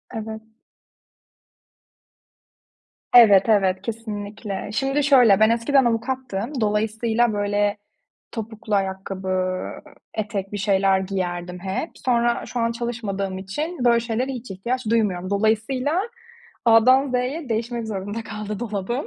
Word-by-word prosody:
Evet. 220 Hz, 0 st, -5 dB, 2.7 s
Evet, 210 Hz, -3 st, +8 dB
evet, 190 Hz, -3 st, +3 dB
kesinlikle. 210 Hz, -2 st, -5 dB
Şimdi 270 Hz, +5 st, 0 dB
şöyle, 245 Hz, -8 st, +6 dB
ben 220 Hz, +1 st, +5 dB
eskiden 245 Hz, +4 st, +3 dB
avukattım. 240 Hz, +1 st, -2 dB
Dolayısıyla, 220 Hz, +2 st, +1 dB
böyle, 205 Hz, 0 st, 0 dB, 0.5 s
topuklu 220 Hz, -1 st, -4 dB
ayakkabı, 190 Hz, -1 st, -2 dB, 0.5 s
etek 205 Hz, -3 st, -3 dB
bir -, -, -2 dB
şeyler 195 Hz, -1 st, +2 dB
giyerdim 180 Hz, -2 st, -3 dB
hep. 195 Hz, -, -3 dB
Sonra 240 Hz, -1 st, +1 dB
şu 245 Hz, -, -4 dB
an 230 Hz, 0 st, +1 dB
çalışmadığım 215 Hz, -5 st, -3 dB
için 255 Hz, -, -4 dB
böyle 235 Hz, -1 st, +5 dB
şeylere 235 Hz, +3 st, -2 dB
hiç 245 Hz, -3 st, -7 dB
ihtiyaç 240 Hz, +7 st, -3 dB
duymuyorum. 195 Hz, -6 st, +1 dB
Dolayısıyla 225 Hz, -, +1 dB, 0.6 s
A'dan 255 Hz, +4 st, +5 dB
Z'ye 255 Hz, +4 st, -2 dB
değişmek 230 Hz, 0 st, -2 dB
zorunda 205 Hz, +2 st, -4 dB
kaldı 215 Hz, -1 st, -6 dB
dolabım. 235 Hz, +3 st, -3 dB
220 Hz, 110 wpm, -23 LUFS, 195-240 Hz, 2.7 s, Evet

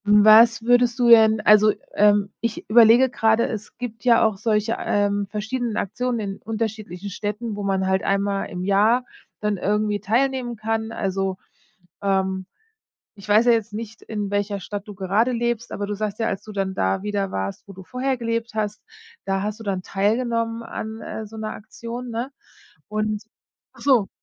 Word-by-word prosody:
Was 215 Hz, +2 st, +6 dB
würdest 245 Hz, +1 st, +3 dB
du 245 Hz, -2 st, +3 dB
denn 220 Hz, -2 st, +7 dB
also, 210 Hz, 0 st, +6 dB, 0.2 s
ähm, 205 Hz, -1 st, +3 dB
ich 230 Hz, -1 st, -3 dB
überlege 235 Hz, +3 st, +7 dB
gerade, 225 Hz, -1 st, +2 dB
es 215 Hz, -2 st, -7 dB
gibt 235 Hz, -2 st, -7 dB
ja 235 Hz, -2 st, +5 dB
auch 215 Hz, -3 st, 0 dB
solche, 215 Hz, +1 st, 0 dB
ähm, 205 Hz, 0 st, 0 dB
verschiedenen 220 Hz, +2 st, -3 dB
Aktionen 245 Hz, +4 st, -2 dB
in 195 Hz, -2 st, -4 dB
unterschiedlichen 215 Hz, -4 st, -4 dB
Städten, 210 Hz, +3 st, -4 dB
wo 205 Hz, -, -5 dB
man 195 Hz, -1 st, 0 dB
halt 190 Hz, 0 st, +1 dB
einmal 200 Hz, 0 st, 0 dB
im 180 Hz, -2 st, -5 dB
Jahr 210 Hz, +6 st, +3 dB, 0.4 s
dann 210 Hz, -1 st, 0 dB
irgendwie 210 Hz, +2 st, 0 dB
teilnehmen 245 Hz, +3 st, 0 dB
kann. 220 Hz, +1 st, -2 dB
Also, 195 Hz, -2 st, -2 dB, 0.7 s
ähm, 190 Hz, -1 st, 0 dB, 0.7 s
ich 200 Hz, 0 st, -13 dB
weiß 215 Hz, +3 st, +5 dB
ja 240 Hz, -, +6 dB
jetzt 225 Hz, -2 st, -1 dB
nicht, 220 Hz, 0 st, -7 dB
in 210 Hz, -2 st, -4 dB
welcher 205 Hz, 0 st, -1 dB
Stadt 205 Hz, +2 st, -6 dB
du 205 Hz, -, -8 dB
gerade 200 Hz, +6 st, +1 dB
lebst, 235 Hz, -1 st, -2 dB
aber 205 Hz, -, -3 dB
du 205 Hz, -, -3 dB
sagst 210 Hz, 0 st, -3 dB
ja: 225 Hz, -, 0 dB
„Als 195 Hz, -1 st, -3 dB
du 215 Hz, -, -10 dB
dann 195 Hz, -2 st, -2 dB
da 95 Hz, -, 0 dB
wieder 200 Hz, -2 st, -2 dB
warst, 95 Hz, -, -5 dB
wo 195 Hz, -, -10 dB
du 190 Hz, -, -11 dB
vorher 260 Hz, +5 st, -2 dB
gelebt 230 Hz, -1 st, -3 dB
hast, 210 Hz, -1 st, -3 dB, 0.4 s
da 195 Hz, 0 st, 0 dB
hast 210 Hz, +2 st, -4 dB
du -, -, -8 dB
dann 195 Hz, -3 st, -2 dB
teilgenommen 230 Hz, +4 st, -1 dB
an, 220 Hz, -1 st, -6 dB
äh, 220 Hz, -, -6 dB
so 220 Hz, +2 st, -12 dB
'ner 215 Hz, 0 st, -4 dB
Aktion“, 235 Hz, +3 st, -8 dB
ne? 235 Hz, +4 st, -3 dB, 0.6 s
Und 215 Hz, 0 st, -2 dB, 0.5 s
ach -, -, -17 dB
so. 250 Hz, -8 st, +3 dB
215 Hz, 180 wpm, -23 LUFS, 200-230 Hz, 0.7 s, denn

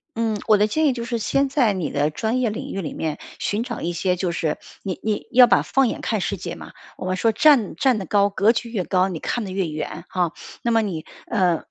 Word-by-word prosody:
嗯， 225 Hz, -2 st, 0 dB
我 215 Hz, -, +6 dB
的 210 Hz, -, +4 dB
建 310 Hz, +9 st, +1 dB
议 280 Hz, -, +3 dB
就 235 Hz, -1 st, -5 dB
是 235 Hz, -1 st, -2 dB
先 275 Hz, +5 st, +1 dB
在 255 Hz, -7 st, +2 dB
你 185 Hz, -4 st, -2 dB
的 145 Hz, +1 st, 0 dB
专 225 Hz, +10 st, -1 dB
业 240 Hz, -4 st, +1 dB
领 215 Hz, -, -6 dB
域 195 Hz, -, -3 dB
里 155 Hz, -, -5 dB
面 155 Hz, -2 st, -3 dB, 0.2 s
寻 210 Hz, +3 st, -1 dB
找 240 Hz, -2 st, -6 dB
一 170 Hz, -, -1 dB
些， 180 Hz, +2 st, 0 dB
就 180 Hz, -1 st, -1 dB
是 160 Hz, -2 st, -2 dB, 0.2 s
你 190 Hz, -3 st, -4 dB
你 215 Hz, -1 st, -2 dB
要 250 Hz, -1 st, +8 dB
把 -, -, +4 dB
放 270 Hz, -1 st, +2 dB
眼 -, -, -4 dB
看 -, -, -1 dB
世 -, -, -2 dB
界 -, -, -5 dB
嘛， -, -, -11 dB, 0.3 s
我 -, -, -6 dB
们 185 Hz, -, 0 dB
说 225 Hz, +4 st, +3 dB
站 245 Hz, -2 st, +4 dB
站 260 Hz, -4 st, +2 dB
得 195 Hz, -, -4 dB
高 200 Hz, +3 st, +3 dB
格 200 Hz, +2 st, +3 dB
局 235 Hz, 0 st, -3 dB
越 215 Hz, -5 st, -2 dB
高， 185 Hz, +1 st, +2 dB
你 170 Hz, -4 st, -5 dB
看 240 Hz, -, -2 dB
的 200 Hz, -, -6 dB
越 190 Hz, -1 st, -1 dB
远 155 Hz, +1 st, -5 dB
哈。 180 Hz, -3 st, 0 dB, 0.3 s
那 235 Hz, -, -1 dB
么 225 Hz, -1 st, +3 dB
你， 170 Hz, -7 st, -4 dB, 0.2 s
呃， 180 Hz, -6 st, +1 dB
205 Hz, 275 characters per minute, -22 LUFS, 180-235 Hz, 0.3 s, 要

